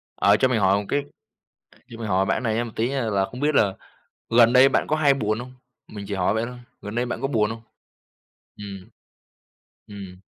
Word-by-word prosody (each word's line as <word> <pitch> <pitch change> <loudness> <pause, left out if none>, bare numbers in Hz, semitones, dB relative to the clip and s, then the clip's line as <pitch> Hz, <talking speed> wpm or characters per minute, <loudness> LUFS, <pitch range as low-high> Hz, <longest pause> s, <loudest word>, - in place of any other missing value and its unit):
ờ, 100 +1 +4
cho 130 - +3
mình 125 -3 0
hỏi 95 0 +3
một - - -9
cái 145 0 0 0.9
cho 115 - -10
mình 115 -2 -5
hỏi 95 0 +1
bạn - - +1
cái - - -3
này 115 -3 -1
nha, 115 +2 0
một 120 - -7
tí 115 +2 0
nha 135 -2 -2
là 100 -1 +1
không 125 +5 -8
biết 150 +1 +1
là 100 -7 +3 0.6
gần 115 0 +5
đây 130 +1 +7
bạn - - 0
có 155 - +1
hay 145 -3 +4
buồn 110 -4 -1
hông? 125 +1 -8 0.4
Mình 105 -1 -7
chỉ 100 - -3
hỏi 95 +1 +1
vậy 110 +1 0
thôi, 125 0 -9 0.2
gần 105 +2 -7
đây 120 +1 0
bạn 120 - -4
có 135 - 0
buồn 110 -6 +1
hông? 115 0 -7 0.9
Ừm, 100 -2 -9 1.0
ừm, 100 -3 -10
115 Hz, 235 wpm, -23 LUFS, 100-125 Hz, 1.0 s, đây